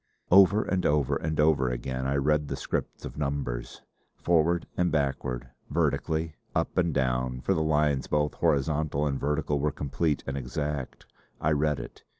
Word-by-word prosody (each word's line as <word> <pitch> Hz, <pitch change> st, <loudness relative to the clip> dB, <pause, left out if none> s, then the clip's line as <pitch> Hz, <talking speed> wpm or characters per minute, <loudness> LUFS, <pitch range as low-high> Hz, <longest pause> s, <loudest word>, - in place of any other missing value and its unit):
Over 100 Hz, +3 st, +7 dB
and 95 Hz, -2 st, -1 dB
over 75 Hz, -3 st, +2 dB
and 80 Hz, +1 st, -2 dB
over 75 Hz, -4 st, +3 dB
again 65 Hz, +2 st, -3 dB
I 70 Hz, -, 0 dB
read 75 Hz, +1 st, +2 dB
the -, -, -3 dB
script -, -, -4 dB
of -, -, -7 dB
numbers. 70 Hz, -4 st, -3 dB, 0.3 s
Forward 85 Hz, 0 st, +2 dB
and 90 Hz, -1 st, +1 dB
backward; 65 Hz, -4 st, -1 dB, 0.2 s
vertically; 80 Hz, +1 st, 0 dB, 0.2 s
up 80 Hz, -, 0 dB
and 85 Hz, -2 st, +2 dB
down, 65 Hz, -2 st, 0 dB
for -, -, +1 dB
the 80 Hz, -, 0 dB
lines 75 Hz, -3 st, +1 dB
both 75 Hz, 0 st, +1 dB
horizontal 75 Hz, +1 st, +1 dB
and 70 Hz, -2 st, -1 dB
vertical 75 Hz, 0 st, 0 dB
were 75 Hz, +1 st, +1 dB
complete 75 Hz, +2 st, -1 dB
and 70 Hz, -, -3 dB
exact, 70 Hz, +1 st, -4 dB, 0.3 s
I 75 Hz, -, +1 dB
read 75 Hz, -1 st, +1 dB
it. -, -, -10 dB
75 Hz, 160 wpm, -28 LUFS, 70-80 Hz, 0.3 s, Over